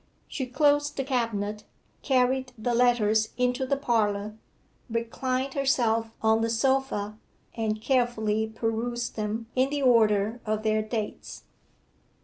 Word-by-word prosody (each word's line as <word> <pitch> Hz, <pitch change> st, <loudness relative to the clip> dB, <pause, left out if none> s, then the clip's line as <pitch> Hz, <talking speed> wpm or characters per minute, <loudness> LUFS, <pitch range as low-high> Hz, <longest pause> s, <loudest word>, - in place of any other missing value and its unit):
She 260 Hz, -3 st, -4 dB
closed 290 Hz, +2 st, +2 dB
the 270 Hz, -, 0 dB
cabinet, 215 Hz, -5 st, -2 dB, 0.4 s
carried 260 Hz, -1 st, +1 dB
the 240 Hz, +2 st, -1 dB
letters 220 Hz, -3 st, +3 dB
into 250 Hz, +1 st, 0 dB
the 280 Hz, -, +1 dB
parlour, 215 Hz, -5 st, 0 dB, 0.5 s
reclined 255 Hz, +3 st, -2 dB
herself 235 Hz, -5 st, +1 dB
on 220 Hz, 0 st, +4 dB
the 230 Hz, -, 0 dB
sofa, 225 Hz, -3 st, 0 dB, 0.3 s
and 215 Hz, -2 st, -2 dB
carefully 220 Hz, -3 st, +1 dB
perused 230 Hz, +2 st, -3 dB
them 215 Hz, +1 st, -3 dB
in 260 Hz, +1 st, +2 dB
the 285 Hz, -1 st, -2 dB
order 220 Hz, -2 st, +3 dB
of 215 Hz, 0 st, -2 dB
their 215 Hz, 0 st, +2 dB
dates. 215 Hz, -1 st, -5 dB
230 Hz, 125 wpm, -27 LUFS, 215-255 Hz, 0.5 s, on